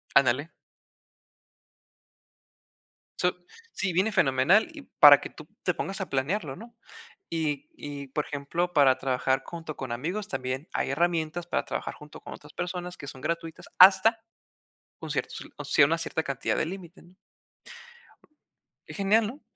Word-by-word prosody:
Ándale. 140 +4 +3 2.7
So 180 - +1 0.4
sí, 190 -1 -1
viene 195 +5 +2
fenomenal 140 - +4
y 295 -3 -10 0.2
para 145 -1 +10
que - - -7
tú 155 - -13 0.2
te 180 - +1
pongas 195 +3 -4
a 190 - -4
planearlo, 140 +2 -1
¿no? 235 +1 -12 0.6
Y 150 -3 -2
y, 140 -1 -7
por 150 +3 -2
ejemplo, 165 +5 -2
para 135 -4 +5
trabajar 130 0 0
junto 165 -3 -7
con 130 -3 -5
amigos 180 - -3
también 130 +2 -4
hay - - -1
herramientas 170 +2 0
para - - -1
trabajar - - -4
junto 150 0 -13
con - - -9
otras 150 +1 -14
personas 180 0 -5
que 140 - -10
son 130 -2 -9
gratuitas 165 +1 -4
hasta 195 +5 +7 0.8
un - - -7
cierto, - - -2 0.2
o - - -7
sea, 140 - +5
una 165 +2 0
cierta 160 -1 -2
cantidad 140 -3 -2
de - - 0
límite, 180 0 -9
¿no? 180 +2 -21 1.7
Qué - - -9
genial, 210 +2 +2
¿no? 270 +7 -9
160 Hz, 150 wpm, -27 LUFS, 140-185 Hz, 2.7 s, para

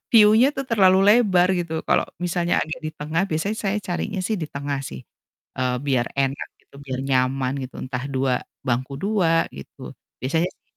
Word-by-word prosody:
view-nya 220 +3 +7
tuh 270 - -2
terlalu 190 -4 +5
lebar." 195 -6 +5
Gitu. 170 -3 -2
Kalau - - +3 0.2
misalnya 175 0 +1
agak 155 +2 -5
di 155 - -3
tengah 155 +4 -1
biasanya 165 +7 -1
saya 200 0 -1
carinya 190 +1 -3
sih, 220 - 0
eee, 170 - -5
di 150 - -4
tengah 140 0 -3
sih 65 - -7 0.9
biar 130 -3 +2
enak 135 0 -1
gitu, - - -29
biar 130 -2 -4
nyaman 130 0 +1
gitu, 130 - -8
entah 130 -1 -4
2 130 -1 +1 0.3
bangku 130 +2 -1
2 175 -3 +2
gitu, 70 - -10 0.3
biasanya 160 +7 +1
sih - - -50
160 Hz, 175 wpm, -23 LUFS, 135-190 Hz, 0.9 s, view-nya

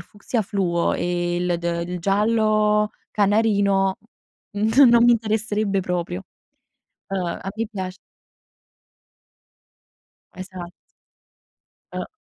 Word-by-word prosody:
fucsia 205 +6 -4
fluo 185 -5 0
e 175 0 -1
il 175 -1 0
de 170 0 -2
ehm, 170 - -5
il 180 - -3
giallo 210 +2 +2 0.2
canarino, 200 -2 +2 0.6
non 225 +6 +5
non 235 0 +6
mi 240 - +7
interesserebbe 215 -3 0
proprio. 175 - -3 0.8
Ehm, 190 -2 -2
a - - -6
me 225 +1 -1
piac 185 -3 -5 2.4
Esa 185 -1 -8 1.3
Ehm - - -4
200 Hz, 100 wpm, -22 LUFS, 180-215 Hz, 2.4 s, mi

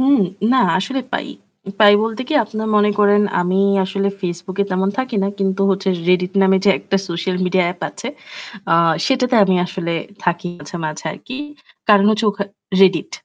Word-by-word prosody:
হুম। 275 +2 +4 0.3
না 260 - +4 0.2
আসলে 265 +8 -2
পাই। - - -2 0.5
পাই 205 -1 +7
বলতে 225 +2 -3
কি 315 - -1
আপনারা 220 0 -5
মনে 210 0 +4
করেন 205 0 +4 0.2
আমি 180 +1 0 0.3
আসলে 195 +1 -1
Facebook 180 +1 -5
এ - - -1
তেমন 190 +1 0
থাকি 260 -3 -2
না। 195 - 0
কিন্তু 195 0 -1
হচ্ছে 195 0 -1 0.2
Reddit 180 0 +2
নামে 190 0 +4
যে 200 - +5
একটা 195 - -2
সোশ্যাল 175 +2 -2
মিডিয়া 180 0 +1
app 175 - -21
আছে, - - -9 0.6
আ - - +4 0.3
সেটাতে 255 -2 +1
আমি 190 -1 +2
আসলে 175 -2 -4 0.3
থাকি 175 0 -1
মাঝে, 145 +3 -12
মাঝে 155 +1 -5
আরকি। 255 - -9 0.5
কারণ 205 -1 +6
হচ্ছে 215 +1 0
ওখা 200 0 -4 0.4
Reddit। 185 -3 +3
195 Hz, 175 wpm, -18 LUFS, 180-215 Hz, 0.6 s, পাই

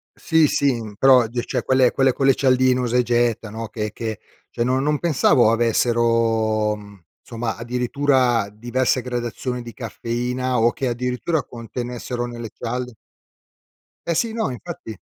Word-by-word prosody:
Sì, 160 -2 +3
sì, 140 0 +1
in 110 -3 -7
però, 130 -2 +6
ge 120 +1 -3
cioè, - - -2
quelle 130 -2 +3
quelle 135 0 +3
cialdine 130 -1 +3
usa 125 0 +1
e - - +4
getta, 120 -2 0
no, 110 +1 -6
che 105 -1 -4
che 110 -3 -5 0.3
cioè, 120 - -2
no 130 +2 +1
non 150 +2 +1
pensavo 140 -7 +3
avessero, 115 -2 +2
mhmm, 100 -3 -14 0.2
insomma, 115 -1 -4
addirittura 125 -1 +1
diverse 120 +4 0
gradazioni 125 0 -4
di 120 - -9
caffeina 125 +2 -3
o 115 +1 +4
che, 130 - -2
addirittura, 125 +6 -1
contenessero 120 +1 -5
nelle 120 -2 -7
cialde 125 +1 -4 1.1
Eh, 170 - 0
sì, 230 -2 0
no, 220 -9 -1
infatti 120 -2 -7
120 Hz, 145 wpm, -22 LUFS, 115-130 Hz, 1.1 s, però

